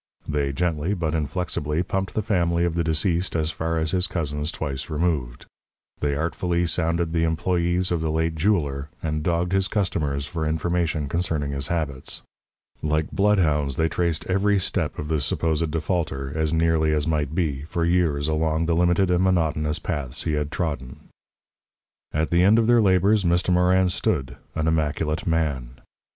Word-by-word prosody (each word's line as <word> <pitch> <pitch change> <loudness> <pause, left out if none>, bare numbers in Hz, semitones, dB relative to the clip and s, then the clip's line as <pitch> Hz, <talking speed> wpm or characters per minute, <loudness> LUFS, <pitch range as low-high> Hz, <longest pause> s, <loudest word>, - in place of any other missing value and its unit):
They 75 -2 0
gently, 85 +4 -1
but 80 -4 -2
inflexibly, 80 0 -1
pumped 95 +1 -3
the 110 - 0
family 85 -4 +1
of 85 - 0
the 85 0 0
deceased 85 +3 0
as 80 -1 0
far 80 0 -2
as 80 0 0
his 90 -1 +1
cousins 75 -2 -2
twice 70 -4 -4
removed. 75 -7 -1 0.5
They 70 -1 0
artfully 85 +3 0
sounded 85 0 0
the 80 -1 +2
employees 85 +2 +1
of 85 -2 0
the 80 - -1
late 80 +1 0
jeweller, 75 -5 0
and 75 -1 -1
dogged 85 +2 0
his 95 0 +2
customers 75 -9 -1
for 80 +2 -4
information 80 -1 0
concerning 80 -2 -1
his 70 -1 -3
habits. 75 -6 -3 0.6
Like 80 0 0
bloodhounds 80 -9 +2
they 80 0 +1
traced 85 -2 -1
every 100 +2 +2
step - - -1
of 75 - -4
the 80 -1 0
supposed 80 0 0
defaulter, 75 -4 -2
as 80 -1 0
nearly 80 -1 +2
as 75 -1 +1
might 75 -2 -1
be, 75 -7 0
for 85 +1 -1
years 85 -4 +1
along 80 +1 +1
the 85 0 +1
limited 90 +2 +3
and 90 +1 +3
monotonous 80 -4 +1
paths 75 -6 -3
he 80 - -1
had 75 -1 -1
trodden. 70 -8 -4 1.0
At 80 +1 -1
the 85 0 +4
end 105 +4 +6
of 115 - +3
their 120 0 +5
labours, 100 +1 +3
Mr. 90 +1 +2
Morin 90 +1 +4
stood, 70 -6 -1 0.2
an 80 0 0
immaculate 80 0 0
man. 70 -7 -1
80 Hz, 165 wpm, -24 LUFS, 75-90 Hz, 1.0 s, end